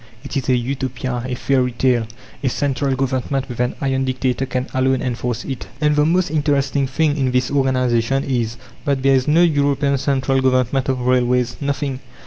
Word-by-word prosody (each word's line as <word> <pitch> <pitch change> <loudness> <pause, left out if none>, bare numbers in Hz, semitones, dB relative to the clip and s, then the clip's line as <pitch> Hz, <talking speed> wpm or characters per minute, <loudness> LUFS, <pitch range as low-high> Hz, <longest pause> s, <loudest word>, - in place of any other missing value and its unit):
It 140 - -7
is 135 -1 -1
a 130 - +5
Utopia, 130 0 -3
a 125 - -2
fairy 125 -1 +1
tale. 120 -2 +1 0.4
A 130 - +2
central 140 0 0
Government, 130 0 -1
with 120 -2 -8
an 125 0 0
'iron' 135 -1 0
dictator, 130 0 -1
can 130 0 -2
alone 130 0 +2
enforce 125 -1 -3
it." 135 -3 -5
And 150 -1 +2
the 150 +1 +3
most 180 -1 +1
interesting 140 -2 +1
thing 145 +2 +1
in 135 -2 +1
this 125 0 0
organization 130 -1 +1
is, 120 -3 -1 0.3
that 140 -3 0
there 135 0 +4
is 130 0 +2
no 160 +4 +5
European 140 -3 +2
Central 135 -1 +1
Government 130 +1 +1
of 130 -1 0
Railways! 125 -1 +1
Nothing! 140 -1 -2
130 Hz, 180 wpm, -20 LUFS, 125-140 Hz, 0.4 s, a